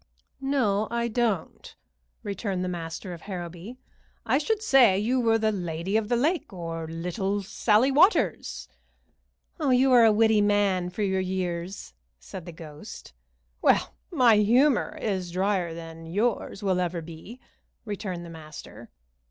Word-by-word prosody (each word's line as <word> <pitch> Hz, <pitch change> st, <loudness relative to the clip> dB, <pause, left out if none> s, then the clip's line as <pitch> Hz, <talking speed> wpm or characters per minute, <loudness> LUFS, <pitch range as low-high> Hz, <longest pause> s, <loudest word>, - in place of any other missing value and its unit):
"No, 225 Hz, -7 st, +1 dB
I 235 Hz, 0 st, -1 dB
don't," 220 Hz, -7 st, -2 dB, 0.5 s
returned 195 Hz, -2 st, -3 dB
the -, -, -2 dB
master 175 Hz, +1 st, -5 dB
of 170 Hz, -, -10 dB
Harrowby. 180 Hz, +4 st, -7 dB, 0.5 s
"I 270 Hz, -, +2 dB
should 430 Hz, +7 st, -1 dB
say 250 Hz, -, +5 dB
you 240 Hz, +6 st, +1 dB
were 225 Hz, -1 st, +3 dB
the 220 Hz, -1 st, +1 dB
Lady 175 Hz, 0 st, -3 dB
of 220 Hz, -1 st, +1 dB
the 245 Hz, -, +2 dB
Lake, 310 Hz, +9 st, 0 dB
or 165 Hz, -3 st, -5 dB
Little 190 Hz, +5 st, -2 dB
Sallie 215 Hz, +6 st, +2 dB
Waters." 360 Hz, +10 st, +2 dB, 0.9 s
"You 265 Hz, -3 st, +3 dB
are 245 Hz, -2 st, +7 dB
a 225 Hz, -, +6 dB
witty 220 Hz, 0 st, +4 dB
man 200 Hz, -3 st, +2 dB
for 195 Hz, +4 st, -3 dB
your 190 Hz, -1 st, +1 dB
years," 185 Hz, 0 st, -4 dB, 0.3 s
said 165 Hz, -, -9 dB
the -, -, -6 dB
ghost. 155 Hz, -, -11 dB, 0.5 s
"Well, -, -, +3 dB, 0.2 s
my 250 Hz, -9 st, +5 dB
humor 245 Hz, +6 st, +3 dB
is 190 Hz, -4 st, -2 dB
drier 185 Hz, -1 st, 0 dB
than 165 Hz, 0 st, -9 dB
yours 205 Hz, +2 st, -1 dB
ever 180 Hz, -2 st, +1 dB
will -, -, -3 dB
be," 170 Hz, +9 st, -11 dB, 0.5 s
returned 195 Hz, -5 st, -5 dB
the -, -, -9 dB
master. 155 Hz, -2 st, -11 dB
200 Hz, 145 wpm, -26 LUFS, 175-230 Hz, 0.9 s, are